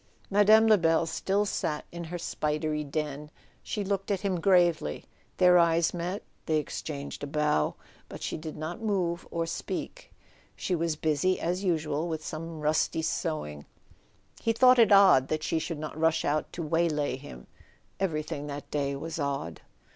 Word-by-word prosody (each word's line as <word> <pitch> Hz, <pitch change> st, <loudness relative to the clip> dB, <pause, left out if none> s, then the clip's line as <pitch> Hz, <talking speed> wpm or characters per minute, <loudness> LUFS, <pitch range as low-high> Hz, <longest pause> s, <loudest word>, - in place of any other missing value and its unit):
Mme. 210 Hz, +2 st, +6 dB
Lebel 170 Hz, -7 st, +4 dB
still 195 Hz, +5 st, 0 dB
sat 150 Hz, -6 st, -2 dB
in 170 Hz, 0 st, -6 dB
her 175 Hz, +2 st, -5 dB
spidery 150 Hz, -2 st, -2 dB
den. 150 Hz, 0 st, -4 dB, 0.3 s
She 210 Hz, -, -3 dB
looked 195 Hz, 0 st, -2 dB
at 200 Hz, -3 st, 0 dB
him 190 Hz, -4 st, -1 dB
gravely, 175 Hz, -, +2 dB, 0.3 s
their 180 Hz, -1 st, +6 dB
eyes 165 Hz, -1 st, +3 dB
met, 180 Hz, +4 st, -3 dB, 0.2 s
they 155 Hz, -, +2 dB
exchanged 145 Hz, -1 st, -5 dB
a -, -, -3 dB
bow, 150 Hz, -, +1 dB, 0.3 s
but -, -, -8 dB
she -, -, -2 dB
did 155 Hz, -1 st, -7 dB
not 160 Hz, +8 st, -5 dB
move 185 Hz, -6 st, -1 dB
or 165 Hz, 0 st, -2 dB
speak. -, -, -5 dB, 0.4 s
She 185 Hz, -, -2 dB
was 165 Hz, -2 st, 0 dB
busy 155 Hz, +4 st, +1 dB
as 180 Hz, +3 st, -2 dB
usual 160 Hz, -3 st, 0 dB
with 160 Hz, -2 st, -4 dB
some 160 Hz, 0 st, -6 dB
rusty 155 Hz, +1 st, +1 dB
sewing 75 Hz, -, -3 dB, 0.7 s
—he 225 Hz, -, +1 dB
thought 255 Hz, +2 st, +6 dB
it 225 Hz, -2 st, +6 dB
odd 195 Hz, -10 st, +7 dB
that 155 Hz, +1 st, -2 dB
she 160 Hz, -, 0 dB
should 165 Hz, 0 st, -4 dB
not 155 Hz, 0 st, -6 dB
rush 160 Hz, +1 st, +1 dB
out 150 Hz, +1 st, 0 dB
to 170 Hz, -, -4 dB
waylay 155 Hz, -3 st, 0 dB
him. 60 Hz, -, -11 dB, 0.5 s
Everything 155 Hz, -5 st, -2 dB
that 145 Hz, 0 st, -7 dB
day 140 Hz, -1 st, -1 dB
was 165 Hz, +4 st, -5 dB
odd. 140 Hz, -, -3 dB
160 Hz, 160 wpm, -28 LUFS, 150-180 Hz, 0.7 s, odd